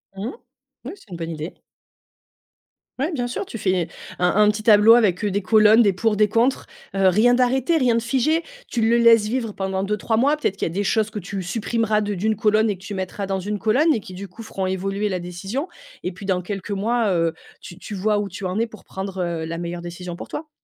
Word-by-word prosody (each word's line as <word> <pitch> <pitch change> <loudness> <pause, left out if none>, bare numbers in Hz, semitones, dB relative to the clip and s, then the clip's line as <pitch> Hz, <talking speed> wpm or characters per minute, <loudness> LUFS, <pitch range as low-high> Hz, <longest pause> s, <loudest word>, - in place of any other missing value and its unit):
Mmh 195 +2 -5
mh. - - -4 0.5
Oui, 315 - -5
c'est 245 - -21
une 170 - -6
bonne 165 -1 -5
idée. 155 +2 -6 1.5
Ouais, 310 +6 -1
bien 245 -4 -1
sûr, 250 +10 -4
tu 230 - -7
fais, 185 -4 0 0.3
un 180 - +3
un 210 0 +5
petit 210 +1 -5
tableau 215 +1 +7
avec, 205 -5 +2
heu, 205 - +1
des 200 - 0
colonnes, 215 +3 +5
des 200 -4 +4
pour, 215 +1 0
des 210 - +4
contre. 230 +5 +1 0.3
Heu, 195 -1 +3
rien 220 +7 +4
d'arrêté, 260 +5 +2
rien 250 -5 +3
de 230 - +1
figé, 270 +8 +1 0.2
tu 235 - -2
le 230 +2 +4
laisses 230 -2 +6
vivre 230 -3 -2
pendant 190 0 -2
2-3 210 +2 -1
mois, 280 +5 +3
peut-être 200 -10 -2
qu'il - - -1
y - - -4
a - - -9
des 200 +2 -1
choses 215 +1 +1
que 215 -1 -5
tu 195 +2 -5
supprimeras 215 +3 0
de 205 0 -2
d'une 215 +3 0
colonne 215 +1 +2
et 200 - -2
que 190 - -18
tu 205 - -6
mettras 190 +1 -4
dans 195 0 -2
une 205 +3 -3
colonne 265 +10 +3
et 220 - -2
qui, 185 - -11
du 195 +2 -7
coup, 220 +5 -11
feront 195 -3 -4
évoluer 195 +2 -1
la 185 -2 -2
décision. 195 - -5 0.3
Et 180 - -2
puis 190 +3 -10
dans 185 -2 0
quelques 195 +2 -6
mois, 220 +2 +1
heu, 165 -2 +1 0.3
tu 175 - -11
tu 205 - -7
vois 205 +2 +1
où 205 - -2
tu 185 0 -7
en 185 +4 -1
es 230 - +1
pour 215 -2 -14
prendre, 190 0 -6
heu, 165 -2 -3
la 165 +1 -4
meilleure 170 0 -5
décision 175 0 -7
pour - - -8
toi. 310 0 -6
210 Hz, 245 wpm, -22 LUFS, 190-230 Hz, 1.5 s, tableau